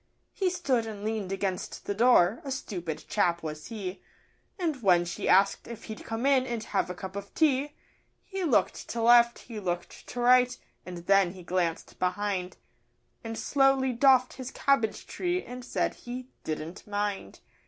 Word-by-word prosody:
He 380 -2 +1
stood 275 -11 0
and 210 -2 -7
lean'd 215 -3 -2
against 195 -1 -3
the 200 - -1
door 225 -2 +4
a 280 - -6
stupid 175 - -4
chap 170 -5 +1
was 155 -1 -6
he 200 -5 -6 0.6
And, 320 -8 -2
when 180 -4 +4
she 170 - -3
asked 195 +2 +4
if 235 -2 -8
he'd 220 -1 -8
come 225 +3 -3
in 265 -2 +4
and 235 -3 -3
have - - -1
a 180 - -4
cup 190 +1 -7
of 200 0 -6
tea, 290 -2 +2 0.5
He 385 -1 -4
looked 295 -10 +1
to 235 - -2
left, 235 0 +6
he 225 -3 -8
looked 175 -3 -4
to 245 - -6
right, 250 +1 +5 0.3
and 175 -1 -7
then 195 -2 +4
he 185 -2 -11
glanced 175 -2 -2
behind, 185 -1 -1 0.7
And 225 -1 -5
slowly 270 -2 +3
doffed 255 0 +4
his 260 -1 -6
cabbage 270 -5 +1
tree, 360 0 -2
and 250 +1 -8
said - - -1
he 250 +1 -8
'didn't 155 +5 -5
mind. 205 -1 -3
220 Hz, 170 wpm, -28 LUFS, 185-255 Hz, 0.7 s, left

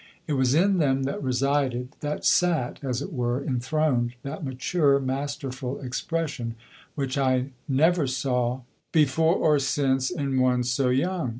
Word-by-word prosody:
It 155 - -2
was 130 -1 +2
in 190 +3 +3
them 135 -3 +2
that 135 - -3
resided, 130 -1 0
that 150 0 -4
sat, 165 -8 +2
as 130 0 -2
it - - -7
were, 120 -1 0
enthroned, 125 -2 0
that 140 +3 -6
mature, 140 +2 +1
masterful 135 -1 -4
expression 130 -2 -3 0.4
which 135 -1 -2
I 130 0 +1 0.2
never 155 +3 +3
saw 125 -1 -1 0.3
before 160 +2 +3
or 150 -5 +3
since 135 -1 +1
in 140 -7 -1
one 125 -1 +2
so 125 +1 +1
young. 165 +3 0
135 Hz, 140 wpm, -26 LUFS, 125-150 Hz, 0.4 s, in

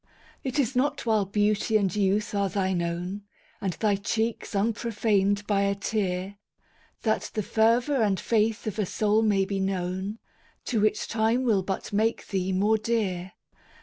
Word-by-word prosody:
It 260 +1 -3
is 265 -2 +1
not 265 +1 0
while 215 -3 +2
beauty 210 +2 +2
and 195 -3 0
youth 205 +1 +1
are 200 -1 +1
thine 185 -1 0
own, 175 +4 -3 0.4
And 190 -3 -1
thy 205 0 +1
cheeks 220 +2 -2
unprofaned 205 -1 +1
by 200 -1 +1
a 200 0 +1
tear, 195 -1 -2 0.7
That 220 -2 0
the 215 - 0
fervor 235 +6 +2
and 200 -3 +2
faith 220 -1 +1
of 215 0 -3
a 210 - +2
soul 215 +2 +2
may 205 -3 +2
be 195 0 -2
known, 190 +2 -2 0.5
To 225 -5 0
which 215 0 +1
time 225 +3 +1
will 220 -6 +3
but 190 +2 -4
make 220 +3 0
thee 190 -1 -1
more 210 +4 +2
dear! 195 -5 -1
205 Hz, 160 wpm, -27 LUFS, 195-220 Hz, 0.7 s, will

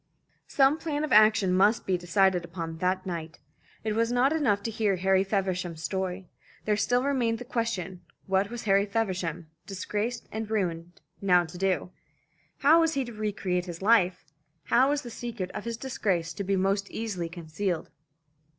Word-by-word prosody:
Some 275 +3 +3
plan 305 -2 -2
of 305 - -3
action 215 -3 +5
must 205 +5 +3
be 190 - +1
decided 180 +1 +2
upon 165 -1 -6
that 185 +2 0
night. 165 -3 -5 0.5
It 215 -1 -1
was 230 +2 +1
not 250 +4 +3
enough 215 -11 +1
to 225 - -2
hear 210 -3 +1
Harry 190 +1 +2
Feversham's 185 -4 -2
story. 190 +1 -3 0.4
There 210 - +2
still 245 +5 +1
remained 250 -5 +1
the 245 - -8
question, 200 -8 -3 0.2
what 195 +1 +1
was 240 0 -6
Harry 200 0 +3
Feversham, 180 -6 -2 0.2
disgraced 210 +4 -3
and 220 0 -4
ruined, 175 -5 -2 0.2
now 180 -3 +4
to 165 +2 -12
do? 185 -1 -1 0.7
How 310 +4 +6
was 325 -2 +2
he 270 -2 0
to 240 - -8
re 215 0 -2
create 180 -3 -2
his 175 +1 -7
life? 195 -5 +3 0.4
How 250 - +4
was 290 0 0
the 240 - -8
secret 225 -6 -5
of - - -6
his 230 -1 -3
disgrace 190 -10 -1
to 200 - -4
be 195 +1 0
most 195 +1 0
easily 195 -7 -4
concealed? 170 +1 -4
195 Hz, 175 wpm, -28 LUFS, 180-230 Hz, 0.7 s, How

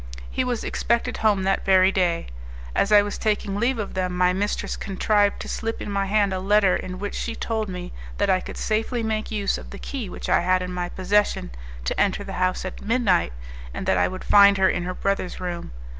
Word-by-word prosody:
He - - 0
was 245 -2 -2
expected 235 +1 0
home 205 -3 +2
that 195 +1 +1
very 190 0 +5
day. 175 -3 +1 0.5
As 200 - +2
I 205 -1 +7
was 205 - -5
taking 210 -2 0
leave 240 +4 +1
of 210 -3 -4
them, 185 -1 -2
my 180 0 +3
mistress 205 +2 -2
contrived 205 +1 +1
to - - -7
slip 225 0 -3
in 205 - -5
my 200 -1 0
hand 200 -1 +2
a 185 - -2
letter 195 0 +3
in 185 0 -5
which 205 +1 -4
she 230 - -3
told 220 -2 -2
me 180 -1 -6 0.2
that 205 - +1
I 190 -1 +3
could - - -8
safely 225 +2 -1
make 220 -1 -2
use 205 -3 -1
of - - -11
the - - -8
key 250 -8 -5
which - - -7
I - - +4
had 185 +1 +2
in 180 0 -5
my 175 -1 -3
possession, 190 - 0 0.3
to - - -2
enter 200 0 +1
the 195 - -7
house 185 0 0
at 185 - -6
midnight, 210 - +2 0.4
and - - -4
that - - +2
I - - +3
would 185 0 -7
find 200 -1 +6
her 190 0 +4
in 175 -1 0
her 180 0 -4
brother's 195 -2 -2
room. 175 -2 -5
200 Hz, 225 wpm, -24 LUFS, 185-215 Hz, 0.5 s, I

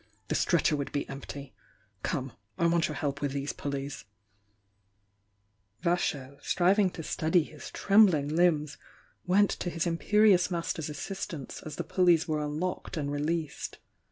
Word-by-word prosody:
The - - +1
stretcher - - +2
would 140 -1 -3
be 145 - -2
empty! 140 0 -8 0.5
Come, 130 -2 -2
— 100 - -45
I 170 - +1
want 170 0 +3
your 150 - -5
help 140 -2 -2
with 140 -2 -1
these 140 +1 -2
pulleys." 140 0 -5 1.8
Vasho, 145 -6 -1
striving 190 +2 +3
to 165 - -6
steady 160 +2 +2
his 150 -1 -10
trembling 195 -8 +4
limbs, 155 -2 +2 0.5
went 200 +3 +4
to 175 - -3
his 165 -1 -2
imperious 185 +2 +4
master's 165 -3 -2
assistance 150 -2 -6
as 155 -1 -7
the - - -3
pul 185 - +1
leys 170 -1 +5
were 155 -2 0
unlocked 160 +5 -3
and 145 -2 -2
released. 150 +1 -2
155 Hz, 150 wpm, -29 LUFS, 145-175 Hz, 1.8 s, leys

